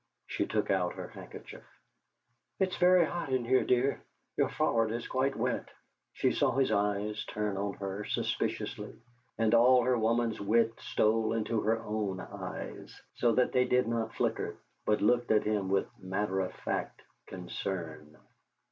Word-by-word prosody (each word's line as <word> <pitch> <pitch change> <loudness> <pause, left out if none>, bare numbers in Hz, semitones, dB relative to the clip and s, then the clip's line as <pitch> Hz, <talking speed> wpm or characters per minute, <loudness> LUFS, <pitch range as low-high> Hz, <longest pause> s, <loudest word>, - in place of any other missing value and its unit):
She - - -2
took - - 0
out - - +1
her - - -7
handkerchief. - - -10 1.0
"It's 190 -1 0
very 180 -1 +6
hot 170 -4 -4
in 130 -2 +1
here, 130 +2 +3
dear; 130 +2 +1 0.3
your - - +2
forehead 115 -1 +1
is 120 - -5
quite 135 +1 0
wet!" 125 +2 -1 0.4
She - - +1
saw - - +2
his 135 +1 +2
eyes 105 +1 0
turn 105 -1 -2
on 100 +1 -2
her 100 +1 -5
suspiciously, - - -2 0.4
and 110 0 +2
all 125 +2 +6
her 125 +1 +3
woman's 115 0 +1
wit 115 +3 +3
stole 110 +1 +1
into 115 0 0
her 110 +1 +2
own 105 -4 -3
eyes, - - -7
so 120 -2 +2
that 125 +2 +2
they 125 0 +3
did 125 -1 +2
not 115 -1 -2
flicker, - - -1 0.3
but 105 - +2
looked 120 +3 +3
at 110 - +4
him 105 -3 0
with 95 0 +2
matter 95 +1 -1
of 95 -1 -1
fact - - -4 0.2
concern. 85 -4 -5
110 Hz, 155 wpm, -31 LUFS, 100-125 Hz, 1.0 s, very